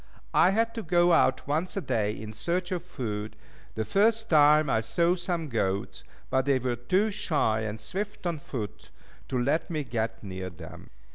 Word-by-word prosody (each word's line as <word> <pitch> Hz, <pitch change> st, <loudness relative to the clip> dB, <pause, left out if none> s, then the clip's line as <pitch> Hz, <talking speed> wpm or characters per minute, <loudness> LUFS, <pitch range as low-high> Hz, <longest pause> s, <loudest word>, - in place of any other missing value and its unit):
I 180 Hz, -, +6 dB
had 225 Hz, +3 st, +1 dB
to 230 Hz, -, -4 dB
go 175 Hz, -1 st, +3 dB
out 130 Hz, -5 st, +3 dB
once 160 Hz, +7 st, -1 dB
a -, -, +2 dB
day 105 Hz, -, 0 dB
in 110 Hz, 0 st, -7 dB
search 175 Hz, -, -2 dB
of 175 Hz, -2 st, -2 dB
food. 110 Hz, -11 st, -5 dB, 0.4 s
The 110 Hz, -, -1 dB
first 220 Hz, -, +2 dB
time, 150 Hz, 0 st, +6 dB
I 110 Hz, -4 st, +2 dB
saw 170 Hz, +10 st, +2 dB
some 175 Hz, -2 st, -2 dB
goats, 100 Hz, -6 st, -2 dB, 0.3 s
but 130 Hz, 0 st, +2 dB
they 140 Hz, -1 st, +3 dB
were 125 Hz, -1 st, -1 dB
too 185 Hz, -, +1 dB
shy 130 Hz, -, +1 dB
and 110 Hz, 0 st, -4 dB
swift 200 Hz, -, -5 dB
of 170 Hz, -4 st, -2 dB
foot, 110 Hz, -8 st, -6 dB, 0.4 s
to 130 Hz, -, -2 dB
let 140 Hz, +6 st, 0 dB
me 155 Hz, -3 st, -2 dB
get 115 Hz, -3 st, -3 dB
near 95 Hz, -2 st, -5 dB
them. 85 Hz, 0 st, -11 dB
140 Hz, 185 wpm, -28 LUFS, 110-175 Hz, 0.4 s, I